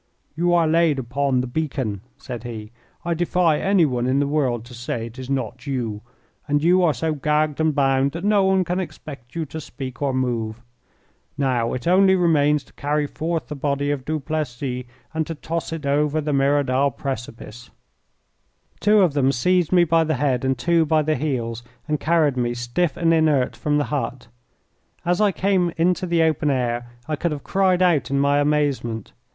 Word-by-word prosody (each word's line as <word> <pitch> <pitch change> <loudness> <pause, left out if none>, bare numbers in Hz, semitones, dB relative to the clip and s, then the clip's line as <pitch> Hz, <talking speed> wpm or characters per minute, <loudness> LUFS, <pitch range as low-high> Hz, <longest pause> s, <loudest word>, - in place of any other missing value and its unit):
"You 175 +2 +1
are 170 -2 +3
laid 165 -2 +3
upon 130 +1 0
the - - -3
beacon," 130 -7 -3 0.2
said 125 -4 -7
he; 110 -3 -7 0.3
"I 170 - 0
defy 175 -2 +1
anyone 155 -11 +2
in 130 +2 +2
the 145 - +2
world 135 -6 0
to 125 - -13
say 120 -1 -4
it 115 +3 -10
is 130 0 -7
not 125 -2 -3
you, 115 -6 -3 0.5
and 145 0 +1
you 180 +2 +4
are 165 -4 +3
so 155 +6 -1
gagged 150 +1 0
and 155 -2 +1
bound 135 -1 +2
that 170 +2 -5
no 205 -1 +3
one 190 0 +3
can 180 +1 -2
expect 140 -8 -8
you 165 -1 -2
to 160 +2 -7
speak 135 -3 -8
or 140 -1 +1
move. 120 -4 -2 0.8
Now, 125 -5 0
it 125 - -5
only 190 +2 +5
remains 150 -5 +3
to - - -24
carry 150 +1 -1
forth 160 +2 -3
the 150 - -6
body 140 0 -1
of 140 -3 -3
Duplessis 140 -4 -3 0.3
and 160 -1 -1
to 165 - -4
toss 165 +2 -4
it 160 -3 -5
over 150 +2 +1
the 150 -1 -2
Merodal 140 -1 +2
precipice." 120 -2 -6 1.1
Two 210 0 +4
of 175 -6 +3
them 135 -2 +2
seized 175 +6 +1
me 180 -1 +5
by 165 0 +3
the 155 -1 0
head 130 -2 0
and 130 -1 +1
two 170 +2 +2
by 155 0 +2
the 155 +1 +1
heels, 120 -5 -2 0.3
and 150 -1 -1
carried 155 -4 +2
me, 120 -1 0
stiff 120 +8 -1
and 165 -1 +3
inert, 155 -5 +2
from 150 -1 0
the 145 - +2
hut. 130 -3 -3 0.8
As 175 +3 +1
I 210 -2 +4
came 185 -2 +1
into 180 +2 +1
the 170 -1 +2
open 155 -1 +1
air 120 -3 -1 0.2
I 155 - -1
could 170 +3 -2
have 145 -2 -5
cried 185 -2 +2
out 170 -6 +2
in 140 0 +1
my 140 +1 +3
amazement. 145 -7 0
145 Hz, 190 wpm, -22 LUFS, 130-165 Hz, 1.1 s, only